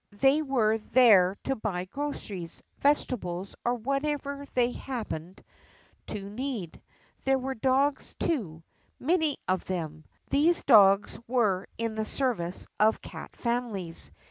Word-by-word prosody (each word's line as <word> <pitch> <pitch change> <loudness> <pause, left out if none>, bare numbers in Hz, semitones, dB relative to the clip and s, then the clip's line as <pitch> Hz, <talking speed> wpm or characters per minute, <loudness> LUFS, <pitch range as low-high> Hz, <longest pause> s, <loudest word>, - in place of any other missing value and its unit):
They 275 +3 +5
were 230 -7 +2
there 210 -5 +5
to 270 - 0
buy 195 -6 -3
groceries, 200 -8 -4 0.2
vegetables, 195 -10 0
or 240 +1 +1
whatever 280 +3 -2
they 245 -1 +3
happened 210 -11 -6 0.6
to 200 -2 -4
need. 215 - -5 0.4
There 270 0 +3
were 265 +1 -3
dogs 265 +3 +1
too 180 - -2 0.2
— - - -40
many 320 -5 +2
of 185 -1 0
them. 160 -4 -4 0.3
These 315 +5 +3
dogs 205 -4 +6
were 215 -7 +1
in 230 -1 -2
the 220 0 -2
service 215 -10 -1
of 220 +1 +4
cat - - -9
families. 235 -8 -1
230 Hz, 125 wpm, -28 LUFS, 190-270 Hz, 0.6 s, dogs